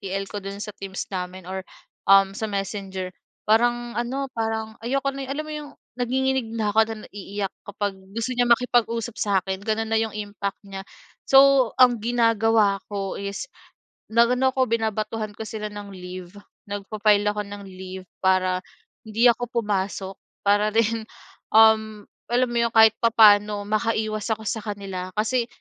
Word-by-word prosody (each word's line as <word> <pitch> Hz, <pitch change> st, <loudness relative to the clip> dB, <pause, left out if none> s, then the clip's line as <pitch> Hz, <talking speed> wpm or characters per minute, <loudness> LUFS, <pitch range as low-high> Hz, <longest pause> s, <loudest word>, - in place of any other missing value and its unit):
TL 195 Hz, -1 st, -3 dB
ko 205 Hz, -, -4 dB
do'n 195 Hz, +1 st, -7 dB
sa 210 Hz, -, -6 dB
Teams 195 Hz, 0 st, -5 dB
namin 185 Hz, 0 st, -5 dB
or, 190 Hz, 0 st, -3 dB, 0.5 s
um, 195 Hz, 0 st, +6 dB
sa 220 Hz, -, -2 dB
Messenger, 195 Hz, -2 st, -4 dB, 0.4 s
parang 240 Hz, +2 st, +2 dB
ano, 265 Hz, +3 st, -2 dB
parang 220 Hz, -1 st, -3 dB
ayoko 275 Hz, +3 st, 0 dB
na 275 Hz, 0 st, -5 dB
eh, -, -, -8 dB
alam 305 Hz, +2 st, -3 dB
mo 310 Hz, -, -6 dB
yung, 300 Hz, -1 st, -6 dB, 0.3 s
nanginginig 260 Hz, -1 st, 0 dB
na 215 Hz, -2 st, 0 dB
ako 220 Hz, -, -1 dB
at -, -, -8 dB, 0.2 s
naiiyak 200 Hz, 0 st, -5 dB
kapag 205 Hz, 0 st, -2 dB, 0.2 s
gusto 230 Hz, +2 st, -2 dB
niya 245 Hz, 0 st, +2 dB
makipag-usap 235 Hz, -1 st, +2 dB
sa'kin, 190 Hz, -2 st, 0 dB
gano'n 220 Hz, +1 st, -1 dB
na 225 Hz, -, +4 dB
yung 225 Hz, -1 st, -2 dB
impact 205 Hz, -1 st, -4 dB
niya. 195 Hz, -1 st, -7 dB, 0.5 s
So, 270 Hz, -3 st, +6 dB
ang 245 Hz, -2 st, +6 dB
ginagawa 225 Hz, -3 st, +3 dB
ko 195 Hz, -1 st, -3 dB
is 200 Hz, 0 st, -4 dB, 0.7 s
nag-ano 245 Hz, +3 st, +3 dB
ako, 260 Hz, -1 st, +2 dB
binabatuhan 220 Hz, -1 st, -1 dB
ko -, -, -6 dB
sila 215 Hz, -1 st, -5 dB
ng 205 Hz, -1 st, -8 dB
leave, 180 Hz, 0 st, -9 dB, 0.3 s
nagfa-file 205 Hz, +1 st, +1 dB
ako 210 Hz, 0 st, -2 dB
ng 200 Hz, 0 st, -8 dB
leave 185 Hz, 0 st, -9 dB, 0.2 s
para, 185 Hz, -1 st, +3 dB, 0.5 s
hindi 220 Hz, +3 st, +2 dB
ako 240 Hz, 0 st, -2 dB
pumasok 195 Hz, -1 st, -2 dB, 0.3 s
para 205 Hz, +1 st, +3 dB
rin, 225 Hz, 0 st, +1 dB, 0.5 s
um, 220 Hz, -1 st, +5 dB, 0.3 s
alam 245 Hz, +1 st, +2 dB
mo 240 Hz, -, -3 dB
'yon, 230 Hz, -, -5 dB
kahit 220 Hz, -1 st, +7 dB
papa'no 210 Hz, -2 st, +5 dB
makaiwas 215 Hz, 0 st, -1 dB
ako 220 Hz, -, -13 dB
sa 220 Hz, -, -2 dB
kanila 195 Hz, -3 st, -5 dB
kasi 230 Hz, +3 st, +1 dB
215 Hz, 155 wpm, -24 LUFS, 200-230 Hz, 0.7 s, kahit